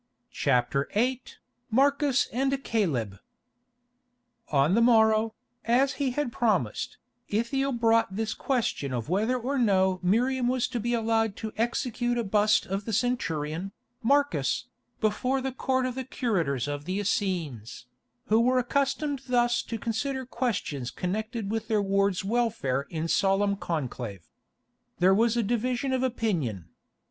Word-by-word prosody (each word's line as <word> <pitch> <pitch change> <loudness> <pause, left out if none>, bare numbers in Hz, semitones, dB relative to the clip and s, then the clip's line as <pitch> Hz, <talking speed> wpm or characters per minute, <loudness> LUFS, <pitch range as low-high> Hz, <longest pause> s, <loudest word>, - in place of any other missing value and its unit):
CHAPTER 135 +1 +1
VIII 250 +4 +1 0.5
MARCUS 280 +2 +3
AND 270 +2 0
CALEB 130 - -1 1.3
On 145 +3 +3
the 230 - +4
morrow, 220 -1 +4 0.3
as 255 +4 +3
he 275 - +2
had 255 0 -2
promised, 205 - 0 0.3
Ithiel 270 +6 0
brought 230 -4 +2
this 220 +1 -1
question 225 - -1
of 120 +2 -3
whether 215 +8 +1
or 260 +3 -2
no 190 -5 +3
Miriam 245 +7 +2
was 255 -1 +1
to 245 -2 -3
be 240 +2 0
allowed 225 -2 +1
to 220 -1 -6
execute 240 +1 -1
a 235 - 0
bust 210 +1 +3
of 195 +2 -3
the 225 - -3
centurion, 185 -6 -1 0.3
Marcus, 285 +4 +1 0.3
before 250 +5 +1
the 265 0 -3
Court 260 0 0
of 255 - -2
the 260 +1 -4
Curators 170 - -1
of 145 0 -4
the 185 +2 -2
Essenes, 165 - -2 0.4
who 220 +1 +3
were 255 +2 +3
accustomed 280 +2 0
thus 240 -1 +2
to 230 - -5
consider 260 +5 -2
questions 215 - -2
connected 215 - -3
with 225 0 -2
their 220 -2 +2
ward's 195 -1 +1
welfare 210 - 0
in 165 0 -3
solemn 200 +2 +2
conclave. 125 - -4 0.7
There 185 +2 +5
was 230 +3 +3
a 235 - +2
division 245 +4 -1
of 260 - +1
opinion. 170 - -1
225 Hz, 140 wpm, -27 LUFS, 185-250 Hz, 1.3 s, There